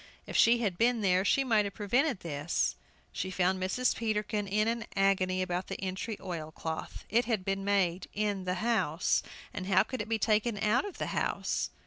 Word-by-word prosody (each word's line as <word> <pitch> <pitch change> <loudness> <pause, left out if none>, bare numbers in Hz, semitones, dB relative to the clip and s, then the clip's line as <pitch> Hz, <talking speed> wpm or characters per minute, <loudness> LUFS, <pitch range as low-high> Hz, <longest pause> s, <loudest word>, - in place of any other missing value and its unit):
If - - -7
she 235 +1 +6
had 195 -6 -1
been 235 0 +3
there 185 -2 +3
she 275 +7 +3
might 220 -5 +3
have 200 - -5
prevented 240 +3 +1
this. 150 0 -1 0.4
She 185 - -3
found 185 0 +1
Mrs. 225 +7 +1
Peterkin 210 -2 -1
in 210 +3 +1
an 230 0 -1
agony 185 -1 +2
about 180 0 -2
the - - -5
entry 195 +3 -4
oil 165 -4 -5
cloth. 160 0 -6
It 235 +2 +2
had 220 -5 -1
been 195 0 -1
made 190 -3 +1
in 205 -2 -1
the 180 0 0
house, 195 -9 +2 0.3
and 185 - -5
how 190 -1 +5
could 255 +1 -4
it 210 - -6
be 225 - +2
taken 215 +1 +1
out 215 - +2
of 405 - -7
the - - -3
house? - - -1
200 Hz, 195 wpm, -30 LUFS, 185-225 Hz, 0.4 s, she